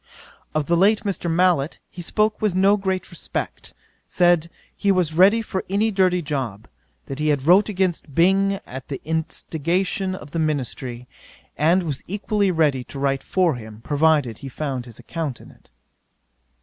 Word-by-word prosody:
'Of 155 -1 +1
the 170 - +2
late 205 +5 +4
Mr. 195 -4 -2
Mallet 165 -4 +2
he 175 - -9
spoke 210 +5 0
with 210 -4 +1
no 195 +2 +5
great 190 -2 -2
respect: - - -5 0.4
said, 175 -2 +3 0.3
he 200 - +2
was 180 -4 +1
ready 200 +7 +5
for 190 -3 -3
any 210 +3 +1
dirty 185 -3 +2
job: 130 -8 -4 0.4
that 135 +1 -6
he 155 - 0
had 145 -3 +1
wrote 190 +6 +5
against 180 -7 -1
Byng 195 +3 +4
at 130 +1 -8
the 135 - -5
instigation 170 +4 -1
of 150 -5 -11
the 165 - -2
ministry, 130 -5 -3 0.5
and 170 +5 +3
was 150 -5 -4
equally 205 +1 0
ready 150 -7 +2
to - - -9
write 135 0 0
for 180 -4 +1
him, 110 -2 -10
provided 145 -5 +2
he 135 - -7
found 130 -2 -4
his 115 - -12
account 155 -7 -5
in - - -14
it. - - -24
165 Hz, 165 wpm, -22 LUFS, 140-190 Hz, 0.5 s, no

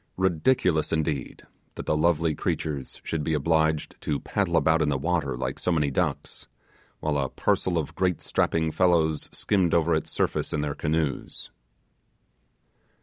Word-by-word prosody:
Ridiculous, 90 -2 +2
indeed, 75 -4 -2 0.3
that - - -6
the - - +1
lovely 80 0 +2
creatures 70 -2 -3
should 80 -2 -2
be 80 +1 0
obliged 80 0 0
to 75 -2 -1
paddle - - 0
about 80 +1 +3
in 75 - +2
the 70 - +1
water, 70 -3 -1
like 65 +1 -3
so 90 - 0
many 75 -4 +1
ducks, - - -2 0.5
while 75 -2 0
a 65 -1 -1
parcel 90 -2 0
of 80 - -2
great 90 -2 0
strapping 80 -1 0
fellows 80 -4 +2
skimmed 95 -5 +1
over 85 0 +3
its 80 - -1
surface - - -1
in 75 - 0
their 75 -1 -2
canoes. 75 -1 -2
80 Hz, 150 wpm, -26 LUFS, 75-85 Hz, 0.5 s, about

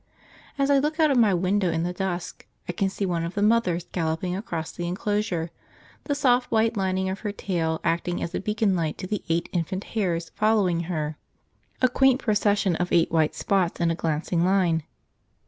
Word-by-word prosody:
As 275 0 +2
I 280 - +5
look 305 +3 -1
out 310 -2 +5
of 260 - +3
my 220 -3 +5
window 185 +1 +1
in 165 0 0
the 180 +1 -2
dusk 180 -2 -4 0.2
I - - -1
can 195 +3 0
see 200 +1 -3
one 170 -3 -1
of 170 +2 -5
the 205 - +1
mothers 210 -6 +2
galloping 165 +1 -1
across 170 -5 -4
the 175 -1 -5
enclosure, 180 -2 -1 0.5
the 285 - 0
soft 255 -3 +2
white 225 0 +2
lining 190 -1 0
of 190 +1 -3
her 205 - -3
tail 165 -5 -2
acting 170 +1 0
as 170 - -4
a - - -1
beacon 210 -1 +1
light 160 -3 -1
to 185 - -6
the 210 +2 -3
eight 165 +1 +1
infant 185 +3 -2
hares 175 -6 -1
following 210 -6 +2
her, 155 -3 -2 0.7
a - - +8
quaint 265 +1 +3
procession 205 -5 +1
of 180 0 -2
eight 165 -1 +3
white 160 -2 +2
spots 190 -4 0
in 170 -1 +2
it 165 - -4
glancing 165 +2 0
line. 180 -3 +2
185 Hz, 200 wpm, -25 LUFS, 170-210 Hz, 0.7 s, a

